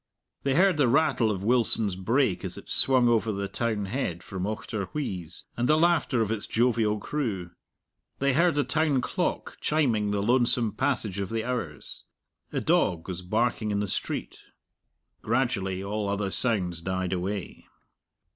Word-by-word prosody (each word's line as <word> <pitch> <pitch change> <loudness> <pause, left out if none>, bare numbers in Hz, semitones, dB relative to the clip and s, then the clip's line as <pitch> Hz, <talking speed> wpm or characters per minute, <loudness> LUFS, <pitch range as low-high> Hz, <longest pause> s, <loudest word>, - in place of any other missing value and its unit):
They 135 -1 0
heard 185 0 +4
the 145 -4 +4
rattle 135 -3 +3
of 95 -3 -2
Wilson's 115 -3 +2
brake 110 +2 +1
as - - -4
it - - -11
swung 130 -2 +4
over 115 -2 +2
the 100 -1 -3
townhead 105 -4 -2
from 95 0 -4
Auchterwheeze, 100 - -3
and 120 +3 0
the 155 - +5
laughter 160 -7 +3
of 110 -1 0
its 110 -2 -3
jovial 115 -3 +2
crew. 100 - -3 0.7
They 140 0 +2
heard 170 +2 +3
the 145 - +2
town 155 -4 +1
clock - - -2
chiming 120 -9 +1
the 100 -1 0
lonesome 120 -1 +3
passage 100 -1 -1
of 100 - -3
the 115 -1 -2
hours. 110 - -4 0.5
A - - -1
dog 80 -2 +1
was 90 -1 -5
barking 110 +3 0
in 100 -1 0
the 105 - -1
street. - - -3 0.8
Gradually 100 -6 0
all 105 +1 -2
other 100 -1 -1
sounds 90 -9 0
died 95 +1 -2
away. 95 0 -4
110 Hz, 155 wpm, -27 LUFS, 95-125 Hz, 0.8 s, the